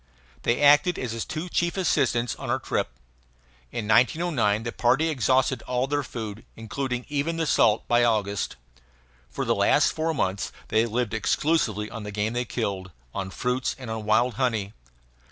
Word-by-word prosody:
They 120 +4 +1
acted 150 +5 +5
as 125 -3 -3
his 115 0 -3
two 160 +3 -4
chief 175 +1 0
assistants 130 -9 +1
on - - -6
our - - +2
trip. - - -1 0.8
In 110 -3 -4
1909 120 - +2
the 120 - -3
party 130 +9 +2
exhausted 130 -3 +2
all 125 0 +1
their 145 +1 0
food, 110 -5 -6
including 125 +2 -4
even 145 +3 -1
the 165 - 0
salt, 110 -7 +3
by 120 0 +4
August. 105 -4 0 0.7
For - - -3
the - - +2
last - - +3
four 160 0 -1
months 95 -5 -1 0.2
they 110 +2 +3
lived 115 0 -1
exclusively 110 -3 +1
on 115 - -6
the 105 0 -6
game 105 +2 -1
they 120 +1 -1
killed, 100 -6 -3 0.2
on 95 -1 -3
fruits, 125 +5 -1
and 125 -4 -7
on 110 -1 -4
wild 115 +4 +3
honey. 110 -5 0
120 Hz, 170 wpm, -25 LUFS, 110-140 Hz, 0.8 s, acted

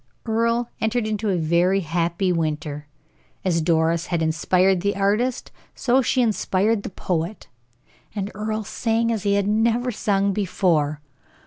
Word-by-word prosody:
Earle 230 +1 +1
entered 220 +1 0
into 215 0 -1
a 185 - +1
very 175 +4 +2
happy 170 +2 0
winter. 150 -3 -2 0.6
As 170 -3 +2
Doris 165 +1 +1
had 170 -2 0
inspired 180 +3 +2
the 200 +1 0
artist 210 +6 0 0.2
so 260 0 +2
she 255 +1 +2
inspired 210 -1 +1
the - - -6
poet; 180 +1 -3 0.7
and 200 -1 -3
Earle 215 +2 -3
sang 230 +2 0
as 220 -3 -1
he 200 0 +1
had 200 -1 +1
never 230 +4 +1
sung 200 -2 0
before. 165 -7 0
195 Hz, 140 wpm, -23 LUFS, 170-220 Hz, 0.7 s, very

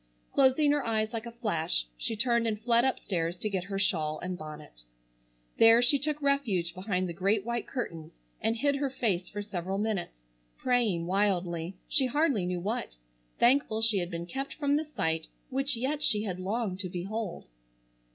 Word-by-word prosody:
Closing 275 +2 +4
her 290 -1 +1
eyes 220 -1 0
like 230 +1 -4
a - - -6
flash 170 - 0
she 140 - -2
turned 235 +1 +2
and 215 -2 -1
fled 235 +1 +3
upstairs 180 -9 -1
to 215 +3 -2
get 185 -2 -1
her 195 0 -3
shawl 155 -6 +1
and 180 +2 -4
bonnet. 150 - -10 0.8
There 225 +1 +8
she 275 +3 +5
took 300 +2 -1
refuge 220 -12 +1
behind 185 0 -1
the 170 - -4
great 195 +4 +1
white 235 0 -2
curtains, 165 - -5 0.2
and 225 - +1
hid 280 +3 +2
her 280 -1 0
face 195 -9 -1
for 205 0 -5
several 190 -1 -3
minutes, 200 - -2 0.3
praying 225 -9 +1
wildly, 180 -2 0
she 270 -3 +2
hardly 265 - +1
knew 180 -1 -1
what, 200 - -3 0.4
thankful 240 -3 +3
she 220 -3 +4
had 175 -1 -2
been 170 -1 -4
kept 270 +10 -5
from 285 -2 +1
the 310 +2 0
sight 160 - -1 0.2
which 275 +1 0
yet 275 +6 -1
she 210 -7 +2
had 185 -4 -3
longed 195 0 -2
to 185 -1 -3
behold. 190 +2 -4
210 Hz, 180 wpm, -29 LUFS, 180-245 Hz, 0.8 s, There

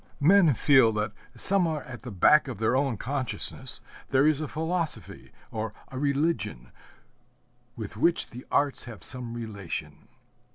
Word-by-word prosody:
Men 170 -2 +5
feel 130 -2 +5
that 105 0 -2 0.2
somewhere 170 -6 +4
at 130 -2 -10
the 125 - -8
back 130 - +4
of 130 - -6
their 110 +4 +1
own 135 -4 0
consciousness 130 0 -1 0.3
there 135 +1 +3
is 155 -1 +2
a 155 - -3
philosophy 160 +2 -4 0.2
or 110 -1 -4
a 130 - -6
religion 140 - -1 1.0
with 105 -2 -7
which 165 +7 +1
the 125 +2 -9
arts 140 -1 +1
have 115 -4 -10
some 125 -3 -6
relation. 95 -10 -7
130 Hz, 140 wpm, -27 LUFS, 110-150 Hz, 1.0 s, Men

